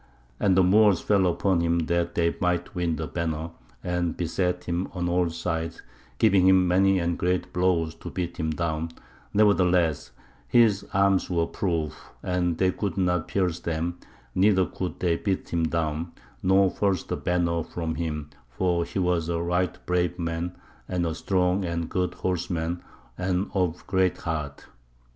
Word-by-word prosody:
And 95 -2 +3
the 95 - +6
Moors 100 0 +5
fell 100 -3 +2
upon 90 +1 +1
him 85 0 +2
that 85 +1 0
they 85 -1 +1
might 90 -1 0
win 85 -3 0
the 80 +1 -3
banner, 80 0 -3 0.3
and 90 -1 -1
beset 90 +1 -1
him 90 +2 -2
on 90 -2 -2
all 90 0 +2
sides, 80 0 -3 0.3
giving 95 -2 +4
him 95 -1 +5
many 95 +2 +4
and 85 -1 -1
great 90 0 0
blows 90 -3 +1
to - - -6
beat 85 -1 -4
him 80 -2 -1
down; 80 0 -2 0.4
nevertheless, 90 -6 +3 0.4
his 110 - +4
arms 100 0 +2
were 85 -2 +1
proof, 80 -6 -3
and 90 -2 0
they 95 -1 +3
could 100 -1 -3
not 90 -3 +1
pierce 90 -3 0
them, 85 +1 -3 0.3
neither 95 -1 +4
could 90 +2 -5
they 85 -2 +1
beat 95 -1 -2
him 85 -1 +1
down, 80 0 -2 0.3
nor 95 0 +4
force 95 -4 0
the - - -3
banner 85 -1 0
from 80 0 -4
him, 75 -3 -4 0.2
for 85 +6 0
he - - -6
was 90 -3 +1
a 85 -1 0
right 90 +1 -1
brave 90 0 0
man 85 +1 -3 0.3
and 90 -2 0
a 80 - -1
strong 90 +2 +1
and 85 -1 -2
a - - -5
good 90 -1 -1
horseman, 85 -1 -2 0.4
and 90 +1 -1
of 90 -3 -1
great 95 -1 +1
heart. 75 -4 -4
90 Hz, 165 wpm, -26 LUFS, 85-95 Hz, 0.4 s, the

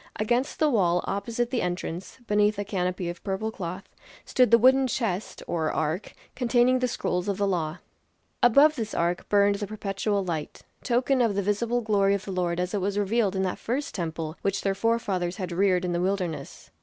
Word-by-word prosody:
Against 240 +5 0
the 310 - +3
wall 180 -10 +2
opposite 235 +4 -2
the 250 - 0
entrance, 180 0 -4
beneath 210 0 +2
a 205 - -3
canopy 180 -2 -2
of 175 +1 -6
purple 210 +3 -2
cloth, 185 -2 -6 0.4
stood 250 -2 +3
the 230 - +7
wooden 260 +3 +5
chest 220 -6 -3
or 160 -2 -1
ark, 160 +5 -2 0.2
containing 250 0 +3
the 250 - +1
scrolls 180 -6 -2
of 200 -2 -1
the 205 - +1
law. 170 -3 -1 0.6
Above 280 +6 +6
this 220 -5 -4
ark 175 +1 -1
burned 200 0 +4
the 205 0 -4
perpetual 200 -1 -2
light, 160 -4 -4 0.2
token 250 +2 +2
of 225 -4 +2
the 200 - 0
visible 235 +4 0
glory 200 -3 +2
of 200 - -5
the 195 - -5
Lord 180 -2 -1
as 180 +2 -2
it 205 - 0
was 200 +2 -1
revealed 205 -1 +1
in 190 - 0
that 185 - -2
first 265 +5 -3
temple 160 -3 -4
which 195 0 -1
their 195 - +1
forefathers 195 -4 -1
had 185 -3 -4
reared 185 0 +2
in 175 - -1
the 175 - 0
wilderness. 185 -4 -3
200 Hz, 195 wpm, -26 LUFS, 180-230 Hz, 0.6 s, the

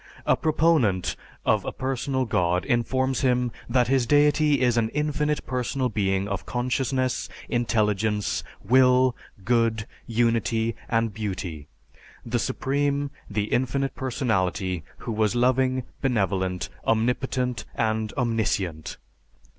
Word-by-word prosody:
A - - +4
proponent 150 - +2 0.3
of - - +3
a - - -3
personal 130 0 -1
God 90 -5 +1
informs 130 +2 +1
him 125 -2 +2 0.2
that 125 -1 +3
his 130 -2 +2
deity 150 +1 +4
is 125 -2 +3
an 115 -2 +1
infinite 150 0 0
personal 125 +1 -1
being 95 -2 0
of 100 -1 -3
consciousness, 130 +1 -1 0.2
intelligence, 105 -3 0 0.2
will, 125 +2 +4 0.3
good, 115 -2 +2 0.2
unity, 115 -1 +1
and 115 -2 +1
Beauty; 90 -8 -5 0.6
the 120 +1 -1
Supreme, 140 +2 -1 0.2
the 105 0 0
infinite 135 +2 0
personality, 95 - -1
who - - -5
was 110 0 +1
loving, 130 +1 +2 0.2
benevolent, 95 - 0
omnipotent, 125 0 0
and 110 -1 0
omniscient. 100 -9 -1
120 Hz, 110 wpm, -25 LUFS, 105-130 Hz, 0.6 s, A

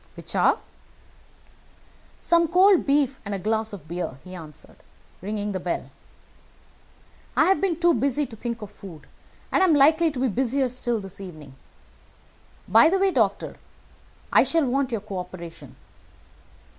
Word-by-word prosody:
"Which - - -7
are?" - - +3 1.6
"Some 335 -1 +3
cold 370 +1 +4
beef 275 -2 +2
and 200 -1 -4
a - - -2
glass 220 +3 -1
of 180 -7 -10
beer," 170 -5 -4
he 185 - -11
answered, 160 -4 -11 0.4
ringing 205 +2 -3
the 190 - -3
bell. 175 -1 -4 1.5
"I - - +5
have 385 - +3
been 355 -4 0
too 345 0 +4
busy 275 +4 0
to 230 - -10
think 230 0 -5
of 205 - -9
food, 185 -6 -12 0.5
and - - +2
I - - +6
am 320 - +4
likely 315 +4 +5
to 280 -4 -6
be 260 - +2
busier 260 +3 0
still 240 -2 -2
this 195 -1 -10
evening. 155 -8 -10 1.1
By 320 - +6
the 385 - +2
way, 385 0 +2
doctor, - - 0 0.8
I - - +7
shall 330 -3 +2
want 265 +1 0
your 225 -3 -2
co 195 -2 -6
operation." 180 -2 -9
235 Hz, 155 wpm, -24 LUFS, 195-300 Hz, 1.6 s, I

